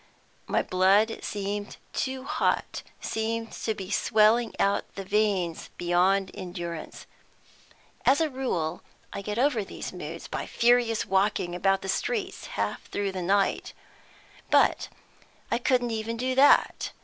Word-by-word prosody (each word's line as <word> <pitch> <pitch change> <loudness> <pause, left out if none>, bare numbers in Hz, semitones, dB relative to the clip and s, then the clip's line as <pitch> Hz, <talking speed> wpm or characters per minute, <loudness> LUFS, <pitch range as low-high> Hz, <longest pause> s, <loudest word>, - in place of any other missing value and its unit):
My - - +1
blood 195 +5 +3
seemed 205 0 -4 0.2
too 260 -1 -2
hot, - - -1 0.2
seemed 225 +1 -2
to 220 - -3
be 190 0 -7
swelling 220 +2 +3
out 200 0 0
the 195 - -5
veins 195 -4 0
beyond 185 +2 +2
endurance. 175 -3 -6 1.0
As 275 - +4
a 325 - +2
rule 255 - -2 0.3
I - - -4
get 210 +2 -4
over 250 -4 +2
these 195 - -7
moods 165 -2 -7
by - - -4
furious 235 -2 +3
walking 195 -2 +1
about 195 +2 +1
the - - -5
streets 390 - -2
half - - -2
through 200 -1 -2
the 185 -1 -4
night, 195 +2 +1 0.8
but - - +3 0.6
I - - +2
couldn't 245 -2 +1
even 225 +1 -3
do 255 +2 -1
that. 275 +2 +4
205 Hz, 135 wpm, -27 LUFS, 190-235 Hz, 1.0 s, As